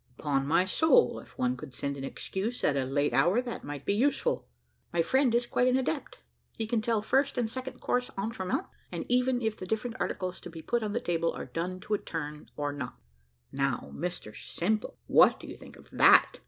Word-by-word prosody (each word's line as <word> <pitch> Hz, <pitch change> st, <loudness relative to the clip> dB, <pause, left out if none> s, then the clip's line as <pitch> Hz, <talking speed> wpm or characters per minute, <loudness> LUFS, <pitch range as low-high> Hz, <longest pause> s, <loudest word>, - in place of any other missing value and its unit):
"Upon 140 Hz, -2 st, 0 dB
my 170 Hz, +4 st, +4 dB
soul, 320 Hz, -, +4 dB
if -, -, -16 dB
one 125 Hz, 0 st, +1 dB
could 130 Hz, 0 st, -9 dB
send 140 Hz, 0 st, -2 dB
an 135 Hz, -, -6 dB
excuse 200 Hz, -, -3 dB
at 145 Hz, -, +3 dB
a 135 Hz, -1 st, +1 dB
late 145 Hz, +1 st, +1 dB
hour, 175 Hz, -, +4 dB
that 245 Hz, -2 st, -4 dB
might 145 Hz, -1 st, -6 dB
be -, -, +2 dB
useful." 285 Hz, -, +1 dB, 0.4 s
"My 170 Hz, -1 st, +2 dB
friend 260 Hz, -, +3 dB
is 240 Hz, 0 st, +2 dB
quite 245 Hz, +1 st, +2 dB
an 255 Hz, 0 st, +4 dB
adept. 275 Hz, +3 st, -2 dB, 0.4 s
He 225 Hz, -, -1 dB
can 225 Hz, 0 st, 0 dB
tell 220 Hz, -1 st, 0 dB
first 275 Hz, +5 st, +2 dB
and 240 Hz, -2 st, +1 dB
second 260 Hz, +3 st, -6 dB
course 250 Hz, 0 st, 0 dB
entremets, 195 Hz, -2 st, -2 dB, 0.3 s
and 170 Hz, -, -4 dB
even 250 Hz, 0 st, +2 dB
if 220 Hz, -1 st, 0 dB
the 185 Hz, -, -7 dB
different 220 Hz, +2 st, -2 dB
articles 185 Hz, -1 st, -2 dB
to -, -, -8 dB
be 165 Hz, -1 st, -9 dB
put 240 Hz, -, 0 dB
on 210 Hz, -2 st, -2 dB
the 235 Hz, -, +1 dB
table 170 Hz, -5 st, 0 dB
are -, -, -6 dB
done 180 Hz, +2 st, -4 dB
to 215 Hz, -, -3 dB
a 210 Hz, -, +2 dB
turn, 150 Hz, -1 st, -6 dB
or 145 Hz, -1 st, -1 dB
not." 130 Hz, -3 st, -5 dB, 0.6 s
"Now, 135 Hz, -2 st, -1 dB
Mr 170 Hz, -11 st, -4 dB
Simple, 210 Hz, -, -2 dB
what -, -, +6 dB
do -, -, -10 dB
you -, -, -8 dB
think -, -, -13 dB
of -, -, -17 dB
that?" -, -, +6 dB
190 Hz, 215 wpm, -29 LUFS, 145-240 Hz, 0.6 s, what